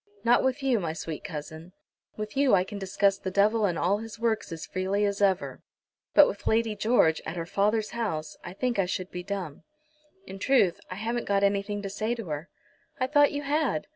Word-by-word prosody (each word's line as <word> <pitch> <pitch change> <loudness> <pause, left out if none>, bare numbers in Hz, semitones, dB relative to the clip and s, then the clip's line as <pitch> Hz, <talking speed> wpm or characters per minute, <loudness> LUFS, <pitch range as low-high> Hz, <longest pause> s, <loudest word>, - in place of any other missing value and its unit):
"Not 240 +1 +4
with 260 +2 0
you, 255 -4 +2
my 165 -4 -2
sweet 160 -1 -6
cousin. 160 0 -8 0.4
With 215 +2 -5
you 270 -5 +4
I 180 - +3
can 200 +2 -7
discuss 195 +1 +1
the 190 - -3
devil 210 +3 +3
and 175 -3 -2
all 195 +4 +1
his 225 0 -8
works 225 -4 -1
as 165 -1 -6
freely 190 +3 -1
as 200 0 -2
ever; 195 -2 +1 0.5
but 295 - +9
with 200 - -6
Lady 225 -1 +2
George, 205 -7 +3
at 160 - -5
her 165 -1 -3
father's 210 +4 0
house, 180 -10 -3
I - - -7
think 245 +1 -1
I 190 - +2
should 185 0 -4
be 180 - -5
dumb. 185 -5 -5 0.6
In 195 - -9
truth, 200 -7 +3
I 185 - -5
haven't 230 +4 -3
got 200 0 +2
anything 200 +1 0
to 195 - -3
say 215 +4 -1
to 230 -3 -6
her." 150 +4 -4 0.5
"I 255 - +2
thought 290 +1 +4
you 290 0 -3
had." 285 - 0
200 Hz, 210 wpm, -27 LUFS, 185-230 Hz, 0.6 s, but